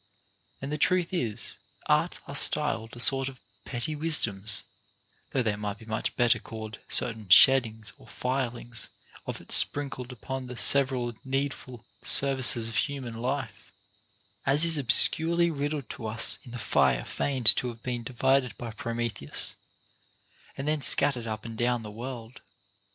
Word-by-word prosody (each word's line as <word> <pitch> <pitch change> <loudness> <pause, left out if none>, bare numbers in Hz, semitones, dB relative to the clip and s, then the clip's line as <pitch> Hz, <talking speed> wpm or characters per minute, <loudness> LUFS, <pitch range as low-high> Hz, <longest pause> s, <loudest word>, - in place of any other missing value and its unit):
And 140 - -5
the 150 - -3
truth 180 +2 +1
is, 120 - -2 0.3
arts - - +1
are - - -7
styled 115 0 +2
a - - -10
sort 135 +2 +3
of 130 -2 -14 0.3
petty 130 +5 -4
wisdoms, 115 -10 +1 0.7
though 130 - -1
they 110 -3 0
might 105 -1 -5
be 110 - -15
much 110 -1 -3
better 120 -1 +3
called 110 -1 -9
certain 110 -4 0
sheddings 110 -1 +5
or - - -17
filings 125 -2 -4 0.4
of - - -5
it - - -12
sprinkled 135 -3 +2
upon 130 +2 -7
the 125 -1 -8
several 130 -3 +2
needful 135 -3 -4 0.2
services 130 -4 +3
of 115 -2 -4
human 135 -5 -3
life; 125 -5 -5 0.7
as 145 +4 +4
is 165 -1 +2
obscurely 170 +6 +4
rid 145 -1 -3
dled 145 -5 -5
to 110 - -7
us 110 +1 +2
in - - -13
the 120 - -7
fire - - +1
feigned 130 -5 +2
to 125 - -1
have 115 -1 -9
been 125 -2 -3
first 115 - -9
divided 130 -1 +1
by 120 -2 -7
Prometheus, 115 - -3 1.0
and 135 - -5
then 155 -1 0
scattered 130 -2 +4
up 110 0 -6
and 115 -1 -7
down 120 0 -1
the 105 - -8
world. 120 +1 -9
125 Hz, 155 wpm, -27 LUFS, 115-135 Hz, 1.0 s, sheddings